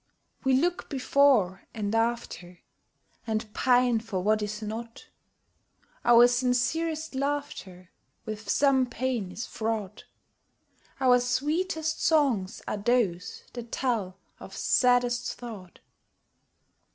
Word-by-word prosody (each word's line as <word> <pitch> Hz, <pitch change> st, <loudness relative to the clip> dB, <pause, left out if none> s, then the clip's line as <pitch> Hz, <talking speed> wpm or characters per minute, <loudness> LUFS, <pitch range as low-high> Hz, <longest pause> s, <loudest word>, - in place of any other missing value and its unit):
We 265 Hz, -, +2 dB
look 345 Hz, +7 st, 0 dB
before 260 Hz, -, +2 dB
and 210 Hz, -1 st, -3 dB
after, 225 Hz, -6 st, -2 dB, 0.7 s
And 215 Hz, -1 st, -3 dB
pine 245 Hz, -2 st, +3 dB
for 220 Hz, -4 st, -4 dB
what 215 Hz, +1 st, +2 dB
is 210 Hz, +1 st, -4 dB
not: 230 Hz, +2 st, -7 dB, 0.9 s
Our 240 Hz, 0 st, +7 dB
sincerest 260 Hz, +7 st, 0 dB
laughter 270 Hz, -, -4 dB, 0.3 s
With 215 Hz, -1 st, -7 dB
some 270 Hz, -1 st, +3 dB
pain 240 Hz, -5 st, -3 dB
is 225 Hz, -, -5 dB
fraught; 220 Hz, -3 st, -4 dB, 0.9 s
Our 250 Hz, -2 st, +5 dB
sweetest 315 Hz, +6 st, -1 dB
songs 270 Hz, -, +1 dB
are -, -, -2 dB
those 205 Hz, -5 st, 0 dB
that 235 Hz, -1 st, -8 dB
tell 215 Hz, -8 st, -2 dB, 0.2 s
of -, -, -10 dB
saddest 245 Hz, -1 st, +2 dB
thought. 210 Hz, -7 st, -10 dB
240 Hz, 105 wpm, -27 LUFS, 215-265 Hz, 0.9 s, Our